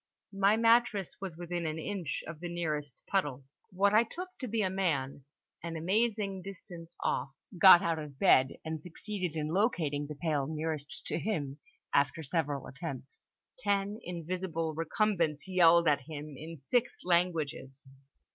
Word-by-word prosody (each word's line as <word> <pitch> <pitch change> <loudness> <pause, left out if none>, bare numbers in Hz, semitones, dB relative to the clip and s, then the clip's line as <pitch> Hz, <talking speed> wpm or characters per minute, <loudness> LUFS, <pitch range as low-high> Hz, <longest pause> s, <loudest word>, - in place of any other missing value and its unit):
My 200 +2 +4
mattress 230 -4 +3
was 185 -5 -6
within 175 -1 -3
an 155 0 -3
inch 170 -2 -3
of 160 -1 -8
the 175 0 -5
nearest 150 -5 -3
puddle. 145 -9 -1 0.3
What 200 +2 +2
I 215 - +7
took 360 +10 -7
to 255 - -4
be 220 -1 0
a 190 - +1
man, 145 -8 -1 0.4
an 170 0 -5
amazing 200 +2 0
distance 175 -3 -10
off, 130 +2 0 0.3
got 185 -2 +10
out 165 -1 0
of 150 -3 -8
bed 130 0 +4
and 160 -1 -4
succeeded 180 0 -5
in 155 0 -2
locating 160 - 0
the 150 - -6
pail 145 -3 -1
nearest 155 -1 -4
to - - -2
him 150 -9 -2 0.3
after 145 +3 +2
several 145 -2 -1
attempts. 135 -2 -8 0.3
Ten 205 -1 0
invisible 170 -1 -3
recumbents 165 -1 0
yelled 170 -2 +5
at 145 -2 +3
him 150 -1 -7
in 160 +4 -8
six 235 - 0
languages. 160 -6 0
165 Hz, 150 wpm, -31 LUFS, 150-195 Hz, 0.4 s, got